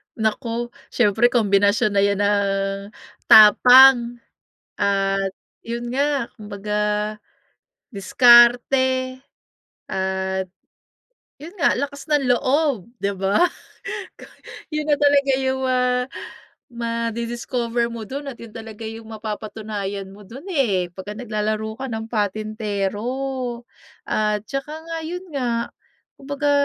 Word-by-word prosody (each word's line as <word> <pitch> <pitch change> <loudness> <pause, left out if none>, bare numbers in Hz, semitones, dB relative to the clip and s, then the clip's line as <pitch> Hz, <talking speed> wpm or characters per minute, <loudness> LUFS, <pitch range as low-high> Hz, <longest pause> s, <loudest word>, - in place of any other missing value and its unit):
Naku, 230 +2 -2 0.2
siyempre 225 0 +3
kombinasyon 210 -1 +2
na 200 -1 +2
'yan 200 0 +1
ng 195 -1 0 0.5
tapang 240 +2 +7 0.5
at 195 -1 0 0.3
yun 235 +1 -5
nga, 280 -2 0
kumbaga 210 -1 -4 1.1
diskarte. 245 +5 +4 0.7
At 190 0 -2 0.9
yun 315 +6 -11
nga, - - +3
lakas 285 +3 -5
ng 295 -3 +2
loob, 255 - +1
di 200 0 -1
ba? 195 +1 0 1.4
Yun 305 0 -2
na 295 - +4
talaga 285 -1 +3
yung 265 0 -1
ma 255 0 +1 0.9
madi-discover 235 0 -2
mo 230 -1 -6
dun 280 +4 -6
at 240 - -11
yun 230 - -10
talaga 225 -1 -9
yung 225 0 -8
mapapatunayan 210 -2 -5
mo 205 +2 -14
dun, 260 - -11
eh, 205 - +1
'pag 190 +3 -7
naglalaro 215 -1 -3
ka 270 - -4
ng 220 0 -4
patintero. 215 +4 -3 0.5
At 210 -1 0
tsaka 275 +2 -5
nga, 330 0 -4
yun 360 +3 -6
nga, 240 -5 -2 0.5
kumbaga 285 +1 -2
230 Hz, 105 wpm, -22 LUFS, 205-260 Hz, 1.4 s, tapang